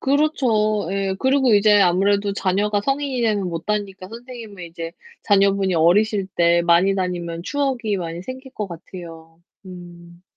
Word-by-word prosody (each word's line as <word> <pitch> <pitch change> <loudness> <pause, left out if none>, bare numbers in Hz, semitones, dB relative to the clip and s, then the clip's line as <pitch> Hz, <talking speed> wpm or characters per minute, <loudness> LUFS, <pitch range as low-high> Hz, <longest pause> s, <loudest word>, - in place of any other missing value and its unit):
그렇죠. 255 - +1
예. 195 -1 -1
그리고 265 -2 +3
이제 205 0 +5
아무래도 200 +2 +2
자녀가 205 +2 0
성인이 275 +2 -1
되면 205 -5 0
못 165 -1 -6
다니니까 200 -3 -3
선생님은 230 -4 -10
이제 165 0 -7 0.3
자녀분이 195 -2 +2
어리실 195 +4 +2
때 170 0 +3
많이 175 +3 +3
다니면 175 -3 -3
추억이 250 -3 -1
많이 170 -1 -5
생길 260 +4 -9
것 210 -2 -4
같아요. 165 -1 -11 0.3
음. 175 -1 -12
195 Hz, 330 characters per minute, -21 LUFS, 175-220 Hz, 0.3 s, 이제